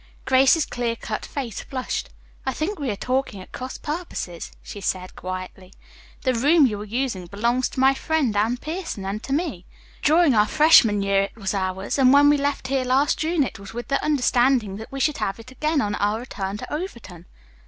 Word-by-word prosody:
Grace's 270 +4 +4
clear 240 -1 -2
cut 220 -1 -5
face 250 -7 -5
flushed. 255 -2 -4 0.3
"I 265 - -1
think 335 - -3
we 280 -3 -2
are 205 - -1
talking 255 -1 -2
at 185 - -12
cross 255 +1 -6
purposes," 295 - -5
she 205 - -8
said 185 -1 -3
quietly. 185 0 -7 0.5
"The 255 - +2
room 290 +6 +5
you 210 -5 -1
are - - -6
using 220 -5 -2
belongs 235 +6 0
to - - -6
my 265 +1 +5
friend 275 -5 0
Anne 220 +4 +1
Pierson 315 - -5
and 200 +2 -3
to 270 - -7
me. 280 - -2 0.3
During 315 -1 +4
our 210 -1 +4
freshman 240 -10 +5
year 195 0 +3
it - - -12
was 195 -3 -3
ours, 190 +4 -2
and 255 -1 +6
when 285 +1 +7
we 295 - +5
left 280 -2 -2
here 270 -1 +1
last 265 +3 +2
June 320 -1 +1
it 250 - -5
was 200 +1 -11
with 240 - -6
the 275 - 0
understanding 250 -7 +2
that 220 - -9
we 275 - -5
should 300 +2 +1
have 195 - -2
it 230 +3 -12
again 305 +3 0
on 205 -4 -1
our 205 +1 0
return 200 -5 -5
to 220 - -7
Overton." 235 - -7
250 Hz, 205 wpm, -23 LUFS, 205-280 Hz, 0.5 s, when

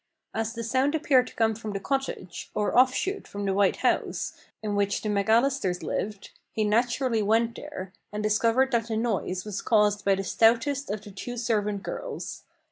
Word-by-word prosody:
As 225 0 -2
the 230 -1 -5
sound 260 +6 +1
appeared 265 -5 +3
to - - -12
come 225 -1 +2
from 215 -1 -6
the 195 - -2
cottage, 265 -6 -3
or 210 - 0
off 255 +1 +6
shoot 390 +9 -2
from 200 0 -5
the 195 - +1
White 200 0 +3
House, - - 0 0.3
in 210 -1 -1
which 200 0 0
the 215 - -1
McAllisters 210 -1 +2
lived, 205 -1 -3 0.2
he 220 - 0
naturally 235 +2 +2
went 225 +3 +2
there, 195 -11 -7 0.2
and 210 +1 -3
discovered 230 +5 +3
that 230 -2 +1
the 220 -1 -1
noise 200 -5 -1
was 210 -2 -4
caused 210 -2 +3
by 195 -1 +4
the 195 - -3
stoutest 235 +7 +2
of 210 0 -3
the 205 - -10
two 245 +6 -6
servant 210 -4 0
girls. - - -6
220 Hz, 190 wpm, -27 LUFS, 205-245 Hz, 0.3 s, off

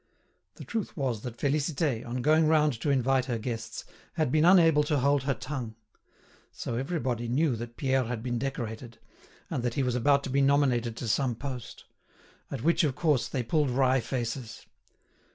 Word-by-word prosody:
The - - -10
truth 225 -6 -4
was 125 -7 -1
that 120 -1 -7
Félicité, 145 -2 0
on 120 +1 -4
going 155 +1 +4
round 150 -2 +3
to 145 - 0
invite 135 -1 +2
her 120 -4 -2
guests, 115 0 -5 0.3
had 155 -6 0
been 155 +2 +3
unable 165 -4 +6
to 150 0 +1
hold 140 +1 +2
her 140 -2 +1
tongue. 125 -3 -5 0.8
So - - -5
everybody 125 -3 -2
knew 135 +2 +1
that 120 +1 -8
Pierre 130 -1 +1
had 115 -1 -4
been 120 -1 -2
decorated, 120 -3 -5 0.5
and - - -1
that 120 -1 -2
he 135 - +1
was 125 -1 0
about 140 +3 +3
to 135 - -4
be 140 +1 +2
nominated 130 -5 +2
to 120 - -4
some 125 +2 +1
post; 125 -1 -7 0.6
at 135 -4 -5
which, 170 +3 +3
of 140 -5 +1
course, 145 -8 +1
they 130 - -2
pulled 150 +3 +1
wry 130 +1 +3
faces. 120 -1 -4
130 Hz, 180 wpm, -28 LUFS, 120-145 Hz, 0.8 s, unable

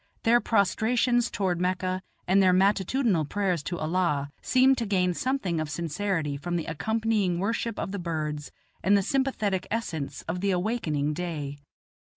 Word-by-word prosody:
Their 240 +1 +5
prostrations 230 +3 +2
toward 180 -4 -1
Mecca 185 0 -1 0.3
and 190 +2 +5
their 185 -1 +5
matutinal 195 - +2
prayers 185 +1 -1
to 175 - -3
Allah 155 -4 0
seem 260 +1 +4
to 235 - -1
gain 180 -3 +2
something 200 -7 -1
of 155 -1 -2
sincerity 165 -1 -2
from 175 +4 -3
the 165 - -1
accompanying 210 +2 0
worship 225 +3 -1
of - - -3
the 200 - -3
birds 155 -4 -3 0.3
and 200 +2 +4
the 200 - +1
sympathetic 215 -8 0
essence 170 -11 -3
of 175 +2 -4
the 200 - +1
awakening 175 -7 0
day. 150 -4 -4
185 Hz, 155 wpm, -27 LUFS, 165-220 Hz, 0.3 s, Their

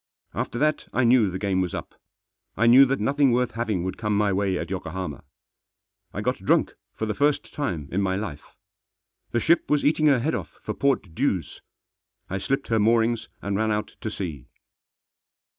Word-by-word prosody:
After - - -3
that 155 +3 +1
I 130 - +2
knew 120 -3 +5
the 90 - -4
game 95 -1 0
was 90 -2 -2
up. - - -7 0.6
I 115 - +3
knew 125 +4 +8
that 135 +1 0
nothing 140 +4 +3
worth 125 +1 +1
having 110 -6 -2
would 95 +3 -4
come 105 -2 0
my 105 -1 +2
way 95 -1 0
at 85 +1 -5
Yokohama. 90 -4 -5 0.9
I - - -4
got - - 0
drunk - - +3 0.2
for 110 - -2
the 105 - -1
first 145 +3 0
time 90 - -3
in 95 - 0
my 95 -1 0
life. 95 -8 -6 0.7
The 120 - 0
ship 165 +8 +2
was 150 -1 +2
eating 155 +1 +3
her 140 -3 +5
head 140 +7 -1
off - - -5
for - - -3
port 135 -11 0
dues. - - -1 0.7
I 95 - -1
slipped 135 +7 -2
her 115 -1 +2
moorings 115 +1 +2
and 100 0 -1
ran 110 +2 +1
out 105 0 -2
to 110 - -3
sea. 80 - -6
110 Hz, 190 wpm, -25 LUFS, 95-130 Hz, 0.9 s, knew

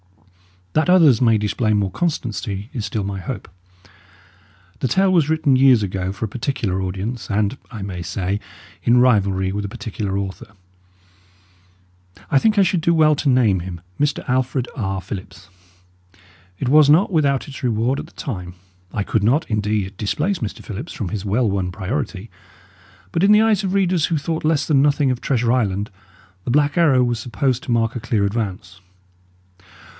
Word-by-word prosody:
That 155 +3 +2
others 160 -10 +5
may 115 -3 +4
display 105 +1 0
more 100 -2 0
constancy 110 - -3
is 115 -6 -3
still 105 0 -3
my 100 0 -4
hope. 100 +1 -6 1.3
The - - 0
tale 190 +6 +2
was 160 -4 +3
written 155 -4 +2
years 130 -4 +5
ago 95 -1 -2
for 100 +3 -4
a - - -6
particular 110 -5 -2
audience 95 +6 -4
and 105 +4 0
(I 110 -5 -7
may 95 -3 -5
say) 95 +3 -2 0.4
in 120 +1 +3
rivalry 100 -6 +2
with 100 +1 -3
a - - -5
particular 100 -2 -4
author; 100 +2 -6 1.8
I 135 - +5
think 215 +7 +2
I 200 - +6
should 180 -2 +1
do 170 +1 +2
well 155 -1 +5
to 140 - 0
name 115 -7 +3
him, 85 -1 -7 0.2
Mr. 145 -1 -1
Alfred 130 0 0
R. 95 -5 -2
Phillips. 95 +1 -9 1.1
It 125 - -2
was 150 0 +6
not 170 +7 +5
without 145 -4 +1
its 140 - -9
reward 120 +2 0
at - - -7
the - - -19
time. 90 -9 -6 0.4
I 105 - -1
could 105 +1 0
not, 140 +9 +2
indeed, 105 -2 -1
displace 150 - -1
Mr. 110 -4 -5
Phillips 110 - -7
from 100 -6 -4
his 105 0 -4
well 110 +4 +1
won 95 -2 -1
priority; 105 +2 -4 0.8
but 165 - 0
in 205 +1 +6
the 210 - +6
eyes 215 -3 +2
of 190 -1 -1
readers 185 -4 +2
who 165 - 0
thought 160 +2 -3
less 155 -2 +2
than 140 -4 +3
nothing 145 -1 +2
of 125 - -3
Treasure 120 -3 +1
Island, 105 -4 0 0.5
The - - -1
Black 145 +2 +2
Arrow 145 -8 +4
was 120 -2 -1
supposed 125 +2 -1
to - - -4
mark 115 0 +1
a - - -2
clear 110 -2 0
advance. 100 -4 -4
115 Hz, 175 wpm, -20 LUFS, 100-145 Hz, 1.8 s, I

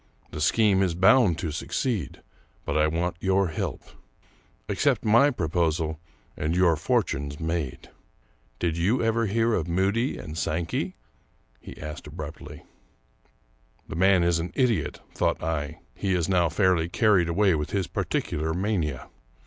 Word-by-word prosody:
The 75 - -5
scheme 100 +3 +3
is 90 -4 +1
bound 95 0 +5
to 85 -2 -3
succeed, 95 - -3 0.4
but - - -2
I 75 0 +3
want 85 +2 -1
your 95 0 +2
help. 80 - -4 0.8
Accept - - +1
my 115 +7 +5
proposal 80 - -1 0.4
and 80 +3 -1
your 90 -2 +4
fortune's 70 -1 -1
made. 80 -5 -3 0.7
Did 85 -1 -1
you 110 +9 +2
ever 115 0 +1
hear 115 -2 +1
Moody 95 +9 0
and 75 - -8
Sankey? 80 +1 -2 0.3
" - - -39
he - - -11
asked 75 0 -7
abruptly. - - -8 1.2
The - - -6
man 95 0 +4
is 85 -1 +2
an 85 +2 -4
idiot, 125 -5 +1
thought - - 0
I; 75 -3 -3
he 95 +5 -1
is 85 -3 0
now 90 -3 +2
fairly 85 -1 +2
carried 95 -4 +3
away 95 +2 +3
with 75 -1 -2
his 95 0 -1
particular 80 -1 -2
mania. 90 - -2
85 Hz, 140 wpm, -26 LUFS, 80-100 Hz, 1.2 s, bound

